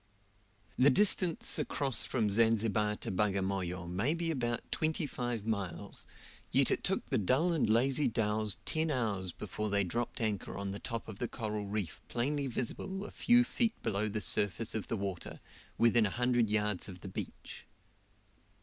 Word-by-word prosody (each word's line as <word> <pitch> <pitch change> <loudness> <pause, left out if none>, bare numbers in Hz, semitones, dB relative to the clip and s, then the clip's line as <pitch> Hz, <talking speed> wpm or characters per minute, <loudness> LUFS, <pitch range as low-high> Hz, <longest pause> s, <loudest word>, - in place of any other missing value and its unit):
The 130 +3 +7
distance 185 +1 +3
across 135 -6 0
from 110 -5 0
Zanzibar 110 -1 +2
to - - -3
Bagamoyo 95 -3 -1
may 100 - 0
be 170 -1 -1
about 120 -5 -1
twenty 155 0 0
five 120 -5 -3
miles, 100 -3 -1 0.4
yet - - +4
it - - 0
took - - 0
the - - 0
dull 135 - +2
and 155 -9 +1
lazy 130 +6 +3
dhows 110 -2 0
ten 160 0 0
hours 105 - -1
before 105 +3 -4
they 100 0 +2
dropped 120 +7 -3
anchor 110 -5 -2
on 100 0 -3
the 100 - -5
top 115 -2 -5
of 105 -3 -8
the 120 - -1
coral 105 -4 -4
reef 100 -5 -4
plainly 140 +4 -1
visible 190 - -4
a - - -8
few 240 0 +4
feet 235 -2 0
below 105 -1 0
the 105 +1 -2
surface 105 +2 +1
of 110 - -3
the 115 - -2
water, 95 -3 -5 0.4
within 115 -2 +4
a - - -2
hundred 120 0 +1
yards 105 -2 0
of 90 -1 -10
the - - -8
beach. 95 - -7
110 Hz, 170 wpm, -32 LUFS, 100-130 Hz, 0.4 s, The